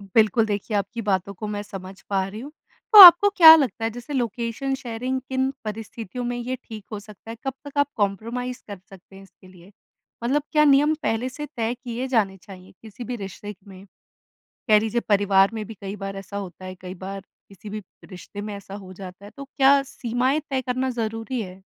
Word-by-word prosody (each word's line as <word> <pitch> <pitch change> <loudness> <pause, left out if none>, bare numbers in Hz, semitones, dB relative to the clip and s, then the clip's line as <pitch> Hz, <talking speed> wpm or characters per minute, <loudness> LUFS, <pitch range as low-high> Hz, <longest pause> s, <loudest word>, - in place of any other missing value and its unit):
बिल्कुल, 220 0 +4
देखिए 205 0 -2
आपकी 200 +4 -3
बातों 200 -2 -1
को 210 +3 -7
मैं 205 -1 -4
समझ 195 -1 -10
पा 190 -1 0
रही 205 +2 -8
हूँ। 285 +4 -9 0.4
तो 425 - +11
आपको 355 +3 +10
क्या 320 -2 +11
लगता 255 -8 -1
है - - 0
जैसे 245 +5 -8
लोकेशन 240 +1 -2
शेयरिंग 255 +1 -4
किन 260 0 0 0.2
परिस्थितियों 225 +2 -6
में 245 0 -3
ये 245 +2 -3
ठीक 215 -2 -10
हो 210 - -4
सकता 210 +1 -15
है? - - -7
कब 270 - -2
तक 285 0 -9
आप 285 -1 +3
कॉम्प्रोमाइज 230 +5 -3
कर 200 -3 -8
सकते 195 0 -16
हैं 195 - -13
इसके 190 -1 -20
लिए? 185 +1 -17 0.5
मतलब 275 +5 +1
क्या 300 -1 +4
नियम 290 +2 +4
पहले 225 +3 -1
से 295 +4 -7
तय 225 0 -1
किए 245 +1 -4
जाने 210 -7 0
चाहिए 185 -3 -13
किसी 220 +1 -10
भी 245 +2 -5
रिश्ते 205 0 -8
क - - -26
में? 190 0 -13 0.8
कह 215 -2 +6
लीजिए 225 +2 -1
परिवार 200 -1 +4
में 220 -1 -5
भी 225 - -8
कई 195 0 -5
बार 195 -1 -6
ऐसा 195 +1 -7
होता 185 -2 -8
है, 185 0 -7
कई 185 0 -7
बार 195 +2 -7 0.3
किसी 200 +1 -12
भी 215 +1 -5 0.3
रिश्ते 195 +2 -9
में 210 0 -6
ऐसा 200 -1 -11
हो 190 -2 -10
जाता 185 +1 -11
है, 205 - -12
तो 280 - -7
क्या 275 0 +4
सीमाएँ 255 +2 -1
तय 265 -1 -1
करना 255 +1 -2
ज़रूरी 225 +1 -3
है? 185 -2 -9
220 Hz, 210 wpm, -23 LUFS, 195-250 Hz, 0.8 s, तो